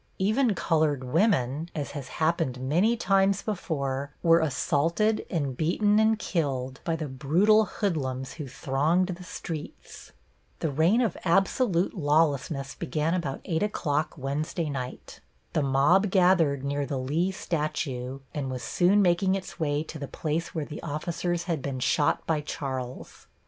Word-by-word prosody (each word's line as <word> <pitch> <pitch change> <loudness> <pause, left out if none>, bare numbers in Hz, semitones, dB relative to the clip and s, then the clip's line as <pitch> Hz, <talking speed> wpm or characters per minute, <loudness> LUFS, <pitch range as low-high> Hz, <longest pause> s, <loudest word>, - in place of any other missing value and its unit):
Even 215 +3 +2
colored 155 -5 +1
women, 155 - +1
as 145 -3 -3
has 140 -3 -6
happened 155 -3 0
many 175 - +2
times 195 -1 +2
before, 140 -9 -3
were 165 -1 +6
assaulted 165 +8 +1
and 145 -8 -1
beaten 205 - +2
and 220 0 +4
killed 135 -9 -2
by 165 - 0
the 155 -2 -4
brutal 170 +12 +3
hoodlums 135 - -2
who 150 -4 -7
thronged 150 +8 +1
the 180 0 -5
streets. 165 -3 -8 0.5
The 160 - -2
reign 165 - +3
of 225 -8 0
absolute 190 +1 +2
lawlessness 145 - +1
began 155 +5 -1
about 160 -7 -2
8 165 -2 -1
o'clock 155 -7 -1
Wednesday 150 +3 -2
night. 130 -2 -6 0.3
The 160 - +2
mob 145 +9 +3
gathered 175 -7 +3
near 140 0 -1
the 140 - -2
Lee 155 +9 0
statue 140 -8 -3
and 140 -3 -3
was 130 -2 -5
soon 190 - +3
making 185 +2 +3
its 190 -1 -7
way 145 -1 0
to 160 -1 -8
the 140 - -5
place 160 +4 -3
where 155 -2 -1
the 150 - -8
officers 170 +3 -2
had 165 -5 -2
been 135 -1 -4
shot 145 +3 +1
by 155 -2 0
Charles. 130 -4 -6
155 Hz, 150 wpm, -27 LUFS, 140-180 Hz, 0.5 s, were